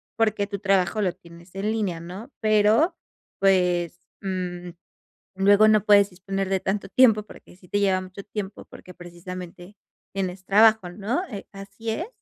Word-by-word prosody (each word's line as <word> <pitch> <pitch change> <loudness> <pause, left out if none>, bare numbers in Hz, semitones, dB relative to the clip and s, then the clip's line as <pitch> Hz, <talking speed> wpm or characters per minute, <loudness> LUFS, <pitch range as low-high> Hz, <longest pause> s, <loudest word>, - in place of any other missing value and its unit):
porque, 215 -3 +1
tu 200 - -4
trabajo 195 +1 +1
lo 180 - 0
tienes 170 0 -17
en 200 +2 -2
línea, 200 -7 -2
¿no? 190 +10 -9
Pero, 215 - +3 0.4
pues, 180 -3 +2 0.2
mm, 180 -2 -4 0.7
luego 205 +2 +5
no 215 -1 +4
puedes 200 -1 +5
disponer 195 +1 -4
de 195 - +1
tanto 195 +1 -3
tiempo, 220 -1 +5
porque, 205 - -16
sí 180 -2 -20
te 205 - 0
lleva 190 -2 +2
mucho 185 +1 -10
tiempo, 205 -1 -6
porque, 180 - -13
precisamente 180 +2 -10 0.4
tienes 185 -1 -4
trabajo, 215 -1 +4
¿no? 215 - -2
Eh, 205 -5 -8
¿así 200 +3 -7
es? 330 - -3
195 Hz, 155 wpm, -24 LUFS, 180-210 Hz, 0.7 s, luego